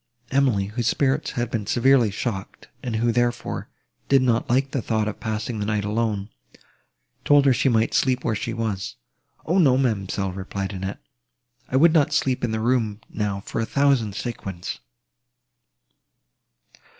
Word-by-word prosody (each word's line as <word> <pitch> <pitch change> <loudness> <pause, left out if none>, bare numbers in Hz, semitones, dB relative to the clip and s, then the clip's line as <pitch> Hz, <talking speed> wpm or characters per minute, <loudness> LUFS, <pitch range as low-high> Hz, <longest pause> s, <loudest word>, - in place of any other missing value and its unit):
Emily, 130 -8 +2
whose 110 +3 -3
spirits 140 +3 +1
had 120 -1 -2
been 105 -4 -2
severely 125 -1 +4
shocked, 100 -1 -5
and 120 -3 -3
who, 115 +2 +2
therefore, 120 0 -1 0.4
did 135 -1 +5
not 115 -2 +1
like 135 +2 +2
the 135 - -1
thought 110 -1 0
of 110 - -4
passing 110 0 -3
the 105 - -1
night 105 -2 0
alone, 105 -1 -1 0.9
told 145 -1 +5
her 135 - +6
she 135 - +2
might 115 -2 +2
sleep 130 -1 +2
where - - 0
she 110 +2 -3
was. 110 -4 -3 0.5
"O, 175 +4 +2
no, 135 -7 +5
ma'amselle," 100 -6 -1
replied 95 +1 -4
Annette, 95 -6 -5 0.7
"I - - -2
would 160 +4 +6
not 150 -2 +3
sleep 130 -3 +1
in 120 - +1
the 110 0 -1
room 110 -3 0
now 100 -2 -2
for 115 - -3
a - - 0
thousand 135 -8 +2
sequins!" 95 -7 -5
115 Hz, 160 wpm, -24 LUFS, 105-130 Hz, 0.9 s, her